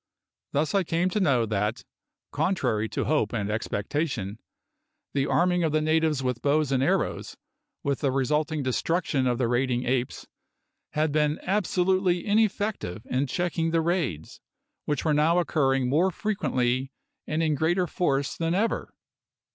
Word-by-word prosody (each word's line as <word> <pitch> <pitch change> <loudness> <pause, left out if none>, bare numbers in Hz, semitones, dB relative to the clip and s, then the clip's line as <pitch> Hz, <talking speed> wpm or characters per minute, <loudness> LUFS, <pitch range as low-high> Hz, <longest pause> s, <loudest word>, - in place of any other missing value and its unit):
Thus 150 +2 0
I 195 -1 +3
came 175 +2 0
to 210 - 0
know 135 - +3
that, 105 +2 -1 0.5
contrary 130 - 0
to - - -2
hope 135 -8 +1
and 105 -3 -1
expectation, 110 - -2 0.7
the 140 0 +1
arming 180 0 +2
of 160 -2 0
the 155 - +3
natives 155 -2 +1
with 125 -2 -2
bows 145 0 +2
and 130 -1 +2
arrows, 135 - -1 0.5
with 140 -1 0
the 140 - +1
resulting 150 +3 0
destruction 135 +1 0
of 120 -1 +1
the 125 -2 +1
raiding 125 +1 0
apes, 125 0 -1 0.7
had 155 0 +1
been 150 0 +1
absolutely 185 -2 +1
ineffective 205 - 0
in 130 +3 +1
checking 170 +2 -1
the 165 0 +2
raids, 160 - -2 0.4
which 145 0 -2
were 155 - +3
now 155 +4 +3
occurring 135 -7 +1
more 160 +9 +3
frequently 135 - -1 0.4
and 155 +2 0
in 155 -1 +2
greater 170 +5 +1
force 140 -6 -1
than 165 +1 -1
ever. 220 +4 -1
150 Hz, 145 wpm, -26 LUFS, 130-170 Hz, 0.7 s, I